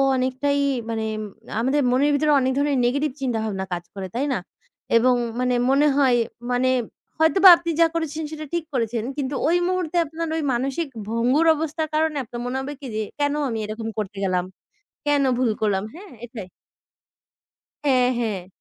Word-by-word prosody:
অনেকটাই 260 +2 0 0.3
মানে 225 -1 -2 0.5
আমাদের 265 +5 +2
মনের 280 +4 +3
ভিতরে 300 +1 +2
অনেক 260 0 +1
ধরনের 285 -1 +1
নেগেটিভ 280 +4 +1
চিন্তাভাবনা 220 -6 -2
কাজ 175 - -3
করে। 195 -1 -5
তাই 265 +4 0
না? 245 - -1 0.6
এবং 250 +2 +4 0.2
মানে 250 0 +1
মনে 280 +3 +4
হয় 265 -4 +4 0.4
মানে, 250 +1 +2 0.5
হয়তোবা 365 +4 +7
আপনি 340 0 -5
যা 330 - +7
করেছেন 320 -1 -2
সেটা 310 0 -6
ঠিক 340 -1 0
করেছেন। 230 -2 -1
কিন্তু 275 0 -2
ওই 340 +2 +3
মুহূর্তে 365 -2 -1
আপনার 325 +2 -4
ওই - - -1
মানসিক 275 +6 -1 0.2
ভঙ্গুর 245 +8 +2
অবস্থার 315 +1 -2
কারণে 310 -1 +1
আপনার 240 +1 -7
মনে 250 +2 -2
হবে 285 +2 -5
কি 270 - -6
যে, 220 - 0 0.2
কেন 290 0 +1 0.2
আমি 225 - -3
এরকম 220 +1 -5
করতে 200 -1 -5
গেলাম, 180 -2 +1 0.6
কেন 290 -1 +3
ভুল 250 -3 +2
করলাম, 200 -3 +1
হ্যাঁ? 380 +3 -12
এটাই। 220 -6 -9 1.4
হ্যাঁ, 255 -3 +4
হ্যাঁ। 205 -6 -3
260 Hz, 165 wpm, -23 LUFS, 230-300 Hz, 1.4 s, হয়তোবা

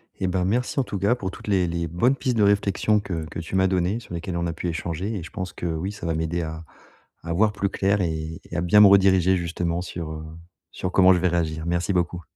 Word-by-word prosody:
Et 95 - -2
ben 90 0 0
merci 125 +7 0
en 135 - +3
tout 100 - -5
cas 105 +6 +2
pour 95 -6 -4
toutes - - -12
les 95 -3 +2
les 85 0 -2
bonnes 115 - +2
pistes 125 -3 -1
de 105 - +4
réflexion 100 +1 +2
que 85 -6 -4
que 80 - -7
tu 85 +3 -5
m'as 95 0 +4
données, 95 +4 0
sur 110 - -11
lesquelles 85 +1 -4
on 85 0 -1
a 85 - -3
pu 85 - -5
échanger 85 +4 -3
et 90 - -4
je - - -9
pense 95 -1 -5
que, - - -7
oui, 85 +4 -2
ça 105 - -8
va 80 -1 -1
m'aider 80 +2 -1
à 80 0 -6 0.6
à 85 0 -3
voir 105 +4 +3
plus 100 -1 -1
clair 100 +1 +1
et 80 -2 -3
et - - -9
à 85 - 0
bien 90 +4 +5
me 105 - +10
rediriger 95 -2 +5
justement 85 0 -2
sur, 85 -3 -6
heu, 80 0 -7 0.5
sur 90 - -4
comment 95 0 +6
je 90 - +2
vais 90 - +2
réagir. 80 -2 -1
Merci 85 +3 0
beaucoup. 90 0 -1
90 Hz, 260 wpm, -24 LUFS, 85-100 Hz, 0.6 s, me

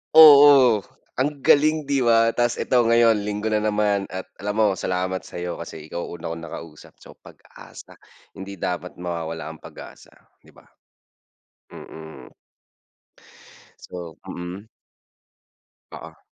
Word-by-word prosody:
Oo, 140 -8 +8 0.3
ang 140 +2 -2
galing 155 +1 +3
'di 140 -3 +1
ba, 115 -1 +3
ta's 120 -1 0
ito 125 -2 +2
ngayon 115 -2 +3
linggo 105 +1 -3
na 105 -1 0
naman 105 -2 0
at 95 0 -6 0.2
alam 105 +1 -2
mo 110 - +4
salamat 95 0 -3
sa'yo 90 0 -6
kasi 80 -2 -9
ikaw 85 - -5
una 85 -1 -8
kong 80 0 -6
nakausap. 80 -2 -12
So - - -15
pag-asa, - - -16 0.4
hindi 95 0 -9
dapat 90 0 -5
mawawala 85 -2 -5
ang - - -21
pag-asa, - - -13 0.3
'di - - -20
ba? - - -22 1.0
Mm. 80 -5 -12 1.6
So 85 -3 -9
mm. 90 +5 -8 1.3
Oo. - - -14
100 Hz, 125 wpm, -22 LUFS, 85-120 Hz, 1.6 s, Oo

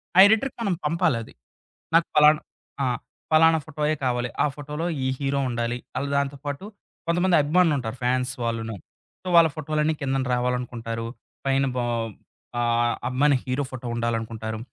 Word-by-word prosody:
ఆ - - +7
ఎడిటర్‌కి 225 +5 +2
మనం 200 -5 +1
పంపాలి 160 -4 +2
అది. - - -14 0.6
నాకు 165 - +5
పలానా 150 0 +6 0.4
ఆ! - - +2 0.5
పలానా 160 +1 +6
ఫోటోయే 155 0 -1
కావాలి. 120 -1 0
ఆ - - +4
ఫోటోలో 150 +3 -5 0.2
ఈ - - +2
హీరో 140 0 0
ఉండాలి, 120 0 -1 0.2
అలా 140 +2 -1
దాంతో 140 0 -1
పాటు 145 +7 -4 0.4
కొంతమంది 175 +1 +3
అభిమానులు 160 +1 +3
ఉంటారు 125 0 -4
ఫాన్స్ 125 +1 +1
వాళ్ళును. 115 -1 -2 0.5
సో, - - -9
వాళ్ళ 165 -1 +8
ఫోటోలన్నీ 155 0 0
కిందకు 135 -1 -1
రావాలనుకుంటారు, 120 -2 -2 0.4
పైన 135 0 +3
బో 120 - +1 0.8
ఆహ్, 120 0 +2
అభిమాని 135 +2 +3
హీరో 130 +3 -1
ఫోటో 125 -1 -6
ఉండాలనుకుంటారు, 115 -1 -2
135 Hz, 145 wpm, -25 LUFS, 120-155 Hz, 0.8 s, వాళ్ళ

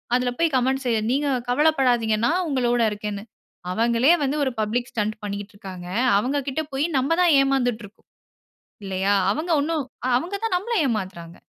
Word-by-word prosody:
அதில 250 0 +1
போய் 330 -4 +2
கமெண்ட்ஸ் 265 +1 0
எழு 220 -1 +1
நீங்க 285 +2 0 0.2
கவலப்படாதீங்க 250 -6 +2
நான் 360 +2 +1
உங்களோட 245 -3 +1
இருக்கேன்னு. 205 -1 -5 0.5
அவங்களே 235 - +3
வந்து 280 +2 0
ஒரு 260 - 0
பப்ளிக் 240 +4 -1
ஸ்டண்ட் 215 -1 -2
பண்ணிக்கிட்டு 205 +1 -5
இருக்காங்க. 185 -3 -9 0.3
அவுங்கக்கிட்ட 275 +5 -1
போய் 280 +4 0
நம்ம 275 +6 +1
தான் 345 -4 +5
ஏமாந்துட்டுருக்கோம். 245 -6 -2 0.8
இல்லயா! 195 +1 0 0.2
அவங்க 330 +8 -4
ஒன்னும் 310 -1 -1 0.2
அ - - +1
அவங்க 365 +4 -6
தான் 370 -5 +1
நம்மள 465 +4 -3
ஏமாத்துறாங்க. 185 -6 -5
245 Hz, 150 wpm, -23 LUFS, 210-285 Hz, 0.8 s, தான்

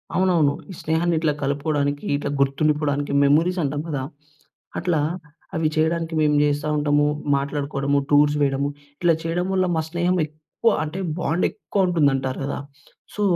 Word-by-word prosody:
అవునవును. 175 -6 +3 0.2
ఈ - - -7
స్నేహాన్ని 165 +2 +1
ఇట్లా 155 -2 +1
కలుపుకోవడానికి, 145 0 -1
ఇట్లా 145 - -3
గుర్తుండిపోవడానికి 145 +1 +1
మెమోరీస్ 165 +6 +3
అంటాం 145 +1 -1
కదా! 140 -4 -2 0.8
అట్లా 170 -4 +1 0.6
అవి 160 -1 +1
చేయడానికి 165 +1 0
మేము 150 -1 +3
చేస్తా 145 +1 0
ఉంటాము. 145 0 +2 0.3
మాట్లాడుకోవడము, 140 0 -1
టూర్స్ 145 0 +5
వేయడము 140 0 +1 0.3
ఇట్లా 175 -1 +4
చేయడం 170 +2 -1
వల్ల 185 -1 +2
మా 160 - +1
స్నేహం 175 +2 0
ఎక్కువ, 155 +9 -1
అంటే 155 +5 -5 0.2
బాండ్ 170 0 0
ఎక్కువ 200 -3 -1
ఉంటుంది 155 -5 +3
అంటారు 130 -1 -3
కదా! 140 - -3 0.6
సో, 210 - -3
150 Hz, 145 wpm, -23 LUFS, 145-170 Hz, 0.8 s, టూర్స్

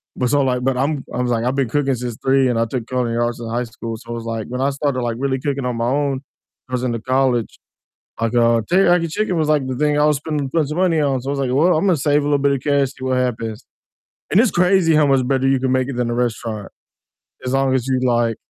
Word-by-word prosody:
but 125 - 0
so 145 +1 +3
like 125 -2 0
but 135 -1 0
I'm 140 +1 -1
I 125 - -1
was 125 -1 -1
like, 115 0 0
I've 130 +2 0
been 135 -4 0
cooking 140 0 +1
since 120 -2 -5
3 135 -1 +3
and 115 -2 0
I 115 - +2
took 115 0 -4
culinary 120 -2 -1
arts 120 0 -2
in 115 - -6
high 120 +2 -1
school, 115 0 -7
so 120 +1 -8
it's 115 - -7
like 115 -2 -4
when 125 +1 -4
I 140 +1 +1
started 140 -2 -1
like 120 -1 -2
really 135 -1 -1
cooking 140 -1 -2
on 125 -2 -2
my 115 - -1
own, 140 -1 0 0.5
I 130 - -10
was 125 - -1
into 120 -2 -1
college, 130 -2 0 0.6
like, 115 +1 0
uh 115 -1 +4
teriyaki 175 -3 +3
chicken 190 +1 -1
was 155 -1 0
like 145 -4 +2
the 130 - -3
thing 150 +2 +1
I 150 - +4
was 150 -2 +3
spending 150 -1 -3
plenty 155 -2 0
of 155 - -3
money 175 -4 +2
on, 135 -3 0
so 135 - -5
I - - 0
was 140 - -2
like, 130 -2 -1
"Well, 165 +6 +4
I'm 165 - 0
gonna 180 -4 +3
save 145 +1 +2
a - - -3
little 145 0 +2
bit 140 0 +2
of 135 - -2
cash, 140 -2 +2
see 135 - -12
what 130 -1 0
happens," 115 -3 -3 0.7
and 190 - +3
it's 235 -2 +3
crazy 180 -2 +3
how 150 -1 +4
much 135 -2 +2
better 135 -1 +1
you 135 - +3
can 130 -1 0
make 130 0 +1
it 135 - -4
than 120 -1 -1
a - - -1
restaurant 115 -3 -3 0.8
as 125 - -2
long 135 -1 +2
as 130 -1 -1
you 130 -1 +1
like 120 -2 +1
130 Hz, 280 wpm, -19 LUFS, 120-145 Hz, 0.8 s, uh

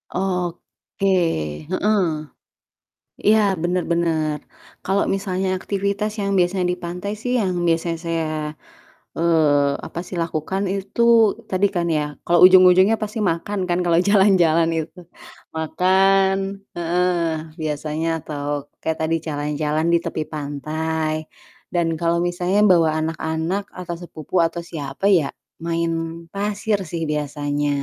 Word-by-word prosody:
Oke, 180 +1 -3 0.6
heeh. 205 +2 +2 1.2
Iya, 215 +1 +6 0.2
bener 180 +1 0
bener. 160 -3 0 0.5
Kalo 195 +1 +1
misalnya 190 -1 -2
aktivitas 200 +2 -2
yang 200 0 -1
biasanya 180 +1 +1
di - - -3
pantai 180 +4 -4
sih, 245 - -1
yang 185 -4 0
biasanya 165 0 0
saya, 165 -1 -1 0.9
eee, 150 -4 +2
apa - - -7
sih, 180 - -7
lakukan 165 +4 -2
itu, 195 +3 -4 0.5
tadi 190 +2 +3
kan 175 -1 0
ya, 150 - +1 0.2
kalo 175 - +3
ujung-ujungnya 185 +3 +7
pasti 215 +2 -3
makan 170 +5 -3
kan 175 0 +1
kalo 170 -1 +3
jalan-jalan 185 -5 +4
itu. 160 +3 -6 0.6
Makan 190 +4 +3 0.4
heeh, 175 +1 +1 0.5
biasanya 155 +1 -2
atau 145 -2 -6 0.4
kayak 160 0 -1
tadi, 160 +1 +1
jalan-jalan 150 +1 -1
di 170 - +5
tepi 155 - -2
pantai 155 +2 -2 0.6
dan 175 -2 +1
kalo 170 0 +2
misalnya 180 +3 0
bawa 165 -3 +4
anak-anak 160 +4 -2
atau 175 -1 -4
sepupu 165 -3 -10
atau 170 +1 -5
siapa, 145 +3 -6
ya 145 -4 -1 0.4
main 170 0 0 0.4
pasir 205 +1 -1
sih 170 -1 -3
biasanya. 145 0 -2
170 Hz, 120 wpm, -21 LUFS, 160-190 Hz, 1.2 s, ujung-ujungnya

